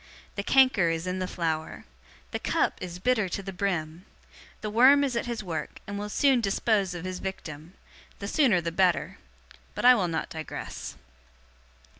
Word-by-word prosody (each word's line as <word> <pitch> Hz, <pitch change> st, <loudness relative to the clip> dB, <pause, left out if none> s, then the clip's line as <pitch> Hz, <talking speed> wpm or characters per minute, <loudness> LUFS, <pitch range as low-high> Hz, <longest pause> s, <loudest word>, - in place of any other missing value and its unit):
The 200 Hz, -, -3 dB
canker 255 Hz, -6 st, +4 dB
is 165 Hz, +1 st, -2 dB
in 185 Hz, 0 st, -2 dB
the 185 Hz, -, -2 dB
flower. 160 Hz, -3 st, -3 dB, 0.5 s
The -, -, -2 dB
cup -, -, 0 dB
is 180 Hz, -1 st, -6 dB
bitter 215 Hz, 0 st, +1 dB
to 195 Hz, -, -4 dB
the 195 Hz, 0 st, -6 dB
brim. 175 Hz, -2 st, -2 dB, 0.6 s
The 215 Hz, -, -4 dB
worm 265 Hz, +6 st, +6 dB
is 265 Hz, -3 st, -1 dB
at 235 Hz, -, -1 dB
his 235 Hz, -3 st, -3 dB
work, 170 Hz, -4 st, -5 dB
and 205 Hz, 0 st, -5 dB
will 210 Hz, 0 st, -4 dB
soon 265 Hz, +2 st, +3 dB
dispose 200 Hz, -2 st, +1 dB
of 175 Hz, 0 st, -6 dB
his 185 Hz, 0 st, -4 dB
victim. 165 Hz, -3 st, -7 dB, 0.4 s
The 200 Hz, -, -6 dB
sooner 225 Hz, -, +3 dB
the 170 Hz, 0 st, -3 dB
better. 180 Hz, 0 st, +1 dB, 0.6 s
But -, -, -2 dB
I 250 Hz, -, +10 dB
will 195 Hz, -7 st, +1 dB
not 165 Hz, -1 st, -3 dB
digress. 160 Hz, -1 st, -6 dB
190 Hz, 175 wpm, -27 LUFS, 170-225 Hz, 0.6 s, I